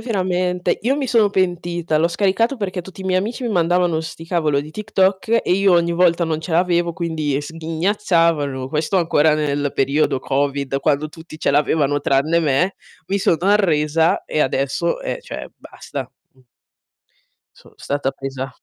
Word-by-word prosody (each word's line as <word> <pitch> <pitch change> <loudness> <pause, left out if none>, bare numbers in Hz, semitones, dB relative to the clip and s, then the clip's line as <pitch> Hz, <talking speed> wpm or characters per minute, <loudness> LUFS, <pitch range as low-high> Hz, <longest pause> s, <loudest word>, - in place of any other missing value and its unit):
veramente. 185 -5 -1
Io 265 +4 +1
mi 280 -2 -2
sono 225 -4 +3
pentita, 175 -4 -1
l'ho 165 - +3
scaricato 200 +8 +1
perché 195 -5 -3
tutti 190 +2 -11
i - - -9
miei 185 -1 +2
amici 225 +7 -4
mi 240 - -2
mandavano 175 -3 +2
'sti 160 0 -8
cavolo 155 -5 +1
di 150 - -10
TikTok 210 +3 +1
e - - 0
io 195 0 +3
ogni 170 0 +2
volta 170 0 +3
non 160 -1 -2
ce 160 - -6
l'avevo 175 0 +2
quindi 155 -5 -2
sghignazzavano. 165 -3 0
Questo 155 +6 -1
ancora 160 -3 +3
nel 145 -2 -1
periodo 140 0 +1
covid 140 0 -1
quando 150 +1 +1
tutti 160 0 -12
ce - - +1
l'avevano 145 0 +2
tranne 140 +4 +2
me, 160 +6 +1 0.3
mi 200 - 0
sono 175 - +2
arresa 165 -5 +2
e 155 - -2
adesso, 140 +6 0
eh, - - -3
cioè - - -7
basta, - - -8 0.2
mh. 130 - -26 1.2
Sono - - -19
stata 140 -1 -2
presa 135 -1 -6
170 Hz, 160 wpm, -20 LUFS, 150-185 Hz, 1.2 s, sono